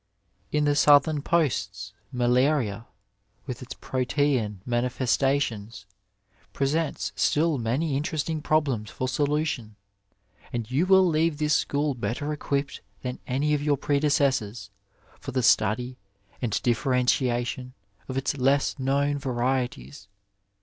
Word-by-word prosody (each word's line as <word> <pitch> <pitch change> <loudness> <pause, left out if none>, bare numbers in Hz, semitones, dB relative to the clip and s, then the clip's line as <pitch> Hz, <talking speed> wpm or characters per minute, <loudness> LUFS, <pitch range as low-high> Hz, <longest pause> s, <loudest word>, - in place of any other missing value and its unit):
In 150 0 +1
the 145 0 +2
Southern 145 +1 +5
posts 100 -12 -1 0.2
malaria 125 -3 +1 0.6
with 125 -3 -6
its 125 - -8
protean 125 -6 -1
mani 120 0 0
festations 125 -5 -1 0.7
presents 145 +3 -1
stiU 155 -2 +2
many 135 +6 0
interesting 155 +2 -2
problems 140 -9 0
for 130 - -3
solution, 145 -5 -1 0.8
and 120 -1 -4
you 155 +8 +1
will 190 -1 +6
leave 160 -1 +1
this 150 0 +1
school 145 0 +1
better 130 +5 -3
equipped 140 -1 -2 0.2
than 125 0 -4
any 140 +4 +1
of 145 - +1
your 145 -1 +1
predecessors 135 -8 0 0.5
for 135 - -7
the 130 -1 0
study 120 +4 +2 0.4
and 120 -5 -1
differen 125 +1 +1
tiation 125 0 0 0.4
of 130 - -3
its 135 +2 -1
less 140 +2 +1
known 140 +2 +1
varieties. 125 - -2
135 Hz, 120 wpm, -26 LUFS, 120-145 Hz, 0.8 s, will